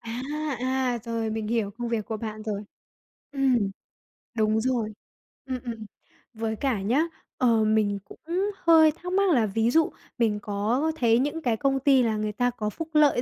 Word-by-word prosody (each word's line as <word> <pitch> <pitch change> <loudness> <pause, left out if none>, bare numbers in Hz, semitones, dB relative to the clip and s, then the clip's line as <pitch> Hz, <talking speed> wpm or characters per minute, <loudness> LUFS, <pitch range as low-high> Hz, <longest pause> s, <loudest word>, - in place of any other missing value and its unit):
À, 230 +1 -5 0.4
à, 255 -1 0
rồi 230 -1 -2
mình 215 -1 -3
hiểu 225 -3 0
công 235 +3 -5
việc 230 -2 -1
của 220 - -3
bạn 215 0 -6
rồi. 210 -1 -4 0.7
Ừm, 270 -3 +3 0.8
đúng 215 0 +2
rồi. 235 -3 0 0.5
Ừm, 260 -1 -3
ừm, 230 -3 -6 0.5
với 220 0 -2
cả 240 -5 -1
nhá, 245 +10 +2 0.3
ờ, 230 -3 +3
mình 215 -2 +2
cũng - - -14 0.4
hơi 325 -2 +6
thắc 355 +4 -7
mắc 395 0 +3
là 235 -7 +4
ví 225 +3 +1
dụ 320 +1 +3 0.3
mình 220 -3 +1
có 215 +10 0
thấy 235 -4 +3
những 295 +4 -1
cái 235 -6 0
công 270 +2 +1
ty 270 -1 +4
là 220 -2 0
người 210 0 -1
ta 245 +3 +1
có 215 -3 -3
phúc 325 +9 -6
lợi 295 -5 +4
235 Hz, 180 wpm, -26 LUFS, 215-265 Hz, 0.8 s, hơi